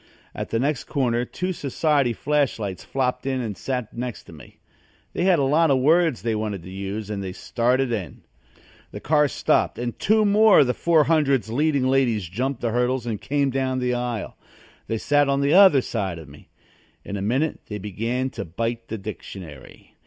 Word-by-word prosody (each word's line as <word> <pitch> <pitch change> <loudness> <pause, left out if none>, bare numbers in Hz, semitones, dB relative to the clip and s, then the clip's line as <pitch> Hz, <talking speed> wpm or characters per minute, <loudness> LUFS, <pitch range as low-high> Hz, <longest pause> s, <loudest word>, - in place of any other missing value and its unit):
At - - -5
the 115 - 0
next 140 +3 -1
corner 125 -4 0
two 185 +8 -3
society 140 -3 +1
flash 145 +5 0
lights 100 -4 -5
flopped 125 -1 -2
in 130 -1 0
and 110 -5 -4
sat 125 +4 -4
next 120 -1 -5
to - - -14
me. 70 -6 -15 0.6
They 175 - -1
had 185 -2 +5
a 140 - +1
lot 155 +4 +3
of 135 - +4
words 160 +1 +2
they 115 -1 0
wanted 105 -4 -3
to 90 - -10
use 100 +2 -5
and 100 -1 -3
they 95 -1 -5
started 125 +5 0
in. 95 - -5 0.7
The - - -8
car 150 0 +3
stopped 130 - +1
and 120 -1 -4
two 215 +1 +3
more 210 +1 +6
of - - +4
the 125 - 0
400's 150 -7 +2
leading 140 0 +1
ladies 120 -8 +1
jumped 125 +8 -3
the 115 - -1
hurdles 125 +1 0
and 110 -4 -4
came 140 -1 0
down 130 0 -1
the 125 -1 0
aisle. 120 -3 -3 0.5
They 115 - -1
sat 145 +4 +2
on 140 0 +1
the 140 +2 +2
other 185 -8 +7
side 95 -8 -3
of 80 - -10
me. 70 +1 -16 0.6
In 100 - -5
a 100 - -3
minute 130 +10 0
they 105 - -5
began 115 +6 -3
to - - -5
bite 115 +7 -4
the 110 - -4
dictionary. 95 - -10
125 Hz, 195 wpm, -23 LUFS, 110-140 Hz, 0.7 s, other